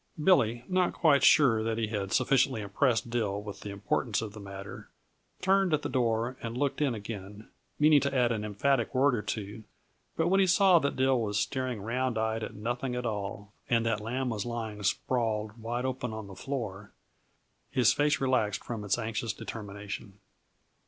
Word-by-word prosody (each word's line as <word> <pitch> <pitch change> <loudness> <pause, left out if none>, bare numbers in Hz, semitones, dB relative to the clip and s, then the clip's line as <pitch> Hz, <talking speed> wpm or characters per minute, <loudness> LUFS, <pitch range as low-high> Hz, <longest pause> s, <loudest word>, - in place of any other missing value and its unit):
Billy, 120 - +3
not 185 -1 +1
quite 145 -5 +4
sure 125 -7 +6
that 115 0 -1
he 110 -2 -1
had 100 -3 -3
sufficiently 130 -2 +2
impressed 115 +3 0
Dill 105 -4 -1
with 105 -1 -8
the 105 - -7
importance 105 +3 -1
of 110 -2 -5
the 110 - -9
matter, 100 0 -9 0.5
turned 190 -3 +3
at 150 - -5
the - - -2
door 120 0 0
and 115 +1 -5
looked 140 +1 -1
in 135 -5 +1
again, 105 0 -8 0.3
meaning 150 -1 +5
to 140 0 -1
add 120 -1 +3
an 110 -2 -2
emphatic 120 +5 0
word 135 +1 +4
or 115 - 0
two; 105 +1 -5 0.5
but 160 - +2
when 195 +2 +3
he 190 - +4
saw 185 -1 +6
that 140 -2 -1
Dill 130 -1 +2
was 105 -2 -1
staring 130 -5 -2
round 125 +1 -1
eyed 110 0 0
at - - -6
nothing 120 +4 -3
at 125 0 -3
all, 105 -2 -4 0.2
and 115 -1 +2
that 115 -2 0
Lamb 125 +4 -2
was 105 -4 -2
lying 115 -3 -5
sprawled 110 0 -1
wide 120 +3 -2
open 130 -3 -3
on 110 -1 -6
the 100 - -10
floor, 105 -6 -5 0.8
his 120 -2 +4
face 145 +2 +2
relaxed 115 -6 +1
from 115 -3 -5
its 105 0 +1
anxious 110 0 -2
determination. 105 -1 -7
115 Hz, 185 wpm, -29 LUFS, 105-130 Hz, 0.8 s, sure